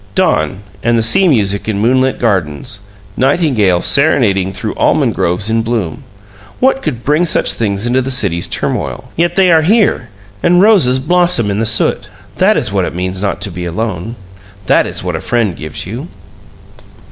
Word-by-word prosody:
Dawn 80 +6 0 0.2
and 120 0 +1
the 115 - +1
sea 190 +12 +4
music 100 - 0
in 105 - -1
moonlit 130 +4 +1
gardens 100 - -2 0.4
nightingales 130 - +1
serenading 105 -10 +2
through - - -5
almond - - +1
groves 90 +4 -1
in 115 0 +1
bloom 110 -8 -3 0.6
what 265 +1 +2
could 125 -7 -4
bring 150 +5 +1
such - - +2
things 100 -1 -2
into 125 +2 +1
the 130 - -4
city's 100 -10 +1
turmoil? - - -3
Yet 170 +1 0
they 190 -2 +4
are 160 -1 +5
here, 195 - +1 0.3
and 175 0 +3
roses 185 - +5
blossom 175 - +1
in 100 - -2
the 115 - 0
soot. 110 0 +2 0.3
That - - +3
is - - -1
what - - 0
it - - -6
means 95 +1 -4
not 100 - -2
to 100 - -1
be 90 0 -6
alone! 105 +3 -4 0.5
That - - +2
is - - -5
what - - -3
a - - -4
friend 115 -7 -1
gives 80 -1 -6
you! 120 - -7
115 Hz, 175 wpm, -13 LUFS, 100-145 Hz, 0.6 s, are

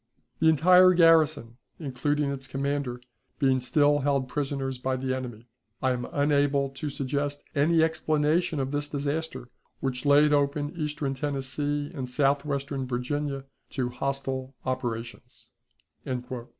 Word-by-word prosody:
The 160 - +5
entire 180 +4 +6
garrison, 160 -8 +4 0.2
including 145 0 -1
its 135 -1 -6
commander, 135 -2 -2 0.4
being 135 -2 +3
still 145 +3 +3
held 140 -2 0
prisoners 135 -1 -3
by 130 +1 -1
the 130 0 -1
enemy, 120 -3 -7 0.3
I 130 - +1
am 125 -1 -2
unable 145 -2 +2
to 140 +2 -5
suggest 145 +1 -2
any 160 +3 +3
explanation 155 0 +1
of 135 0 -2
this 145 0 -1
disaster 145 -2 -3 0.3
which 125 -2 -2
laid 150 +1 +6
open 145 +1 0
Eastern 150 -3 -2
Tennessee 145 +1 -2
and 130 -5 -5
Southwestern 140 0 0
Virginia 135 +2 -2 0.3
to 130 -3 -1
hostile 135 +1 -3
operations." 120 -3 -5
140 Hz, 125 wpm, -27 LUFS, 130-150 Hz, 0.4 s, entire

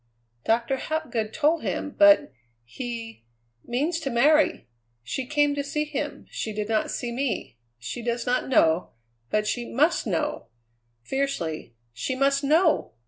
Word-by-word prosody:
Doctor 235 +4 +1
Hapgood 265 -9 -2
told 315 +4 +2
him, 290 - -3
but 305 - +5 0.3
he 230 - -7 0.4
means 300 +8 -1
to 280 - -3
marry! 295 - +3 0.4
She 255 - -4
came 290 0 +2
to 285 0 -2
see 300 +2 -1
him; 300 -1 -4
she 220 - -4
did 210 0 -3
not 220 -1 0
see 240 - -3
me; 240 - -3 0.2
she 120 - -6
does 235 0 -2
not 250 +1 0
know; 165 -8 +3 0.4
but 215 0 +1
she 240 +3 -1
must 305 +3 +2
know!" 170 - -2 0.6
fiercely; 170 - -3 0.2
"she 125 - -3
must 275 +1 +2
know! 315 +3 +3
255 Hz, 140 wpm, -25 LUFS, 225-295 Hz, 0.6 s, but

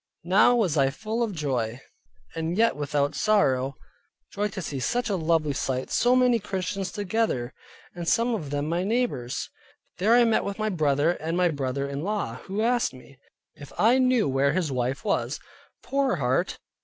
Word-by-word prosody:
Now 195 +7 +5
was 190 -10 +1
I 135 -1 +4
full 220 - -4
of 230 -3 0
joy, 130 - -2 0.5
and 165 +2 -3
yet 230 +1 +4
not - - -14
without 145 -1 0
sorrow; 135 -11 +1 0.6
joy 205 +1 0
to 195 -1 -7
see 145 -6 -4
such 240 - -1
a - - +1
lovely 160 -3 +1
sight, 130 -1 -2
so 245 +1 +3
many 250 -2 +4
Christians 195 -1 -3
together, 205 - -1 0.4
and 175 -2 -6
some 235 +5 +2
of 160 -11 -3
them 145 +1 -2
my 170 +3 0
neighbors. 205 - -2 0.5
There 215 +6 +4
I 245 - +6
met 225 -2 +2
with 200 0 -4
my 215 0 -1
brother, 155 -3 +2
and 165 0 -3
my 180 -1 +3
brother 140 -2 -2
in 140 +1 -4
law, 195 - -2
who 200 +3 -2
asked 235 - +1
me, 135 +1 -16 0.3
if 145 - -12
I 240 +4 +4
knew 255 - +3
where 135 +1 +2
his 175 -6 -1
wife 125 +1 -2
was? - - -1 0.4
Poor 275 -5 +1
heart! 130 -4 0
170 Hz, 180 wpm, -26 LUFS, 140-215 Hz, 0.6 s, I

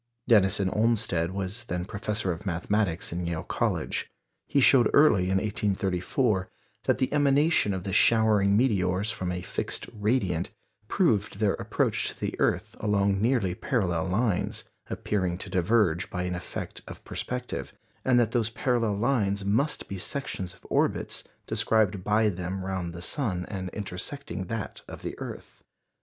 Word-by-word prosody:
Denison 100 -3 +4
Olmsted 105 -7 +1
was 100 +4 -4
then 90 -3 -3
Professor 105 -1 -2
of 85 +3 -5
Mathematics 90 -1 -1
in 85 0 -2
Yale 85 -2 -2
College. - - -1 0.4
He 140 - +2
showed 125 -3 +6
early 110 -11 +6
in 95 +1 +2
1834 100 +1 0 0.4
that - - +3
the 130 +1 0
emanation 145 -4 +3
of 95 -2 -3
the 95 - -4
showering 105 -3 +4
meteors 100 -4 +2
from 95 -5 -3
a 90 0 -4
fixed - - -3
"radiant" 105 -6 0 0.4
proved 105 - +1
their 105 -2 +2
approach - - 0
to - - -12
the - - -2
earth - - 0
along 100 -1 +1
nearly 115 -6 +2
parallel 90 -6 0
lines, 100 +1 0 0.3
appearing 95 -4 -1
to - - -7
diverge 90 -2 +2
by 90 - -3
an 90 0 -2
effect 90 0 -6
of - - -10
perspective; 125 0 -4 0.3
and 125 -2 +4
that 115 -2 +2
those 115 -3 +1
parallel 115 -3 0
lines 100 -5 +1
must 115 +10 0
be 100 - -5
sections 95 -6 -4
of - - -25
orbits - - 0 0.2
described 105 -4 +1
by 105 +2 +3
them 95 0 -3
round 95 -3 -3
the 85 +1 -8
sun 95 -11 -1
and 95 -3 -4
intersecting 100 +3 -5
that 115 +1 -5
of - - -9
the - - -3
earth. - - -8
100 Hz, 150 wpm, -27 LUFS, 90-115 Hz, 0.4 s, showed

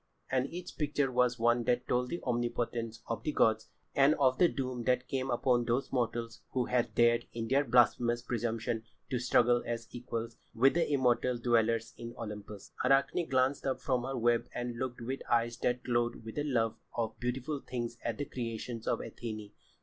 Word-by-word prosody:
And 130 +1 +1
each 175 +1 -8
picture 145 -3 +1
was 125 -1 +2
one 120 0 +2
that 125 +1 +1
told 125 0 +2
of - - -10
the 170 - -4
omnipotence 120 -1 -2
of 115 - -3
the 150 - -1
gods 110 -5 +2 0.3
and 140 +2 +5
of 130 -3 +3
the 180 - +7
doom 130 -5 -3
that 125 0 +2
came 135 0 -2
upon 120 0 +2
those 125 +3 0
mortals 115 -1 -2
who 125 -2 +1
had 125 -1 0
dared 120 0 +4
in 115 -1 -3
their 140 +2 +4
blasphemous 120 -1 +3
presumption 115 -1 -2 0.3
to 125 - +1
struggle 120 0 +4
as 115 0 -4
equals 115 -1 -5 0.2
with 135 +4 +5
the 170 -3 +1
immortal 125 -2 +2
dwellers 115 -1 +1
in 120 0 -7
Olympus. 105 -2 -7
Arachne 140 +5 +2
glanced 130 +1 +2
up 130 -1 0
from 130 -1 0
her 135 +1 -3
web 120 0 +2
and 120 -1 -3
looked 125 -2 -3
with 130 +3 -4
eyes 120 0 +2
that 125 +1 0
glowed 120 -2 0
with 110 - -6
the 145 - -1
love 115 -5 +1 0.2
of 115 -1 -2
beautiful 130 +4 -2
things 120 -2 -5
at 115 - -2
the 145 - -2
creations 115 -2 -5
of - - +1
Athené. 110 -3 -6
120 Hz, 190 wpm, -32 LUFS, 115-130 Hz, 0.3 s, the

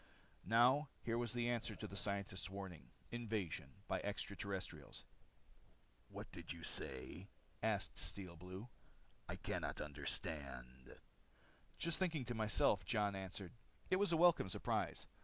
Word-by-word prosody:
Now 125 +6 +6
here 115 0 +1
was 120 -2 0
the 120 -1 +1
answer 120 -1 0
to - - -5
the 100 - -6
scientists' 100 -1 -1
warning. 95 -4 -7 0.2
Invasion 110 - -2 0.2
by - - +1
extra 100 0 -3
terrestrials. 95 -8 -4 1.0
"What - - -7
did - - -6
you 85 -1 -6
say?" 80 +9 +2 0.3
asked - - 0
Steel 95 -4 -1
Blue. 90 +6 -7 0.6
"I - - -1
couldn't - - -2
understand." 70 -3 -1 0.8
"Just 170 -1 +1
thinking 165 -8 +1
to 120 - -2
myself," 110 -3 +3
Jon 100 +2 +2
answered. 95 -1 -4 0.4
It 185 - +6
was 200 -2 +3
a 165 - +4
welcome 170 - +6
surprise. - - 0
100 Hz, 135 wpm, -41 LUFS, 85-120 Hz, 1.0 s, Now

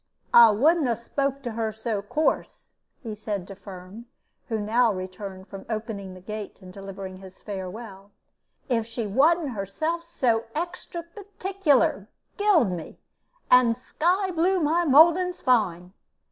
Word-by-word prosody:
"I 235 -1 +9
wouldn't 290 +8 +3
'a 235 - +1
spoke 275 +4 -3
to 240 - -3
her 220 0 -2
so 220 -1 -3
course," 300 +10 -2 0.3
he 225 -3 -5
said 205 -3 -4
to 195 - -9
Firm, 195 +4 -11 0.4
who 225 -4 -2
now 225 +3 +2
returned 190 0 -7
from 195 0 -9
opening 215 -4 -5
the 185 - -12
gate 210 +1 -7
and 185 -2 -13
delivering 195 -1 -8
his 190 0 -13
farewell, 195 0 -8 0.6
"if 230 -4 0
she 230 0 -4
wasn't 295 - +3
herself 280 - -3
so 245 -9 0
extra 345 +1 -4
particular, 370 - 0 0.3
gild 385 - +3
me, 170 -3 -7 0.5
and 245 -2 +6
sky 360 +9 0
blue 360 +3 +2
my 335 +2 +2
mouldings 335 +5 +5
fine. 185 -8 +1
230 Hz, 140 wpm, -25 LUFS, 195-315 Hz, 0.6 s, I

